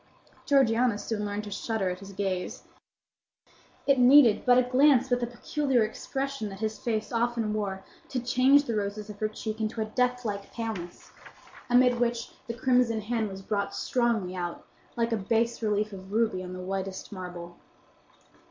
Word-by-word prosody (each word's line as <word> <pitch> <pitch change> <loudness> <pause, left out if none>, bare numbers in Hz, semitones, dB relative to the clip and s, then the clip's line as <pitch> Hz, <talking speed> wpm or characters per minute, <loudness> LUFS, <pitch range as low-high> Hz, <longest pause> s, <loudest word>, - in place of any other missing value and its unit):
Georgiana 245 -5 +3
soon 210 0 -3
learned 205 +1 -3
to 205 - -8
shudder 200 -2 -1
at 180 - -6
his 195 0 -10
gaze. 190 -2 -3 1.2
It 275 -2 +4
needed 250 -3 +6
but 245 0 +7
a 255 - +5
glance 260 0 +4
with 245 - +3
the 240 - -1
peculiar 260 +1 0
expression 270 +2 -3
that 195 -1 -9
his 220 0 -3
face 215 -3 -2
often 230 -2 0
wore 195 -3 -3 0.3
to 255 - -1
change 255 +4 +4
the 235 -5 -3
roses 210 +1 -3
of 205 - -13
her 215 - +1
cheek 215 0 -5
into 220 +1 -2
a 220 - 0
deathlike 235 -3 -1
paleness, 215 -7 -6 0.6
amid 245 0 +4
which 240 -1 -1 0.2
the 235 - -3
crimson 245 -2 +2
hand 220 0 -1
was 195 0 -8
brought 200 0 -2
strongly 230 -7 0
out, 175 -1 -5 0.3
like 230 0 +1
a 225 - +1
bass 230 +4 0
relief 210 -1 0
of 190 0 -10
ruby 220 -4 +1
on 180 0 -7
the 185 - -7
whitest 190 0 -4
marble. 175 -3 -8
220 Hz, 170 wpm, -28 LUFS, 200-245 Hz, 1.2 s, but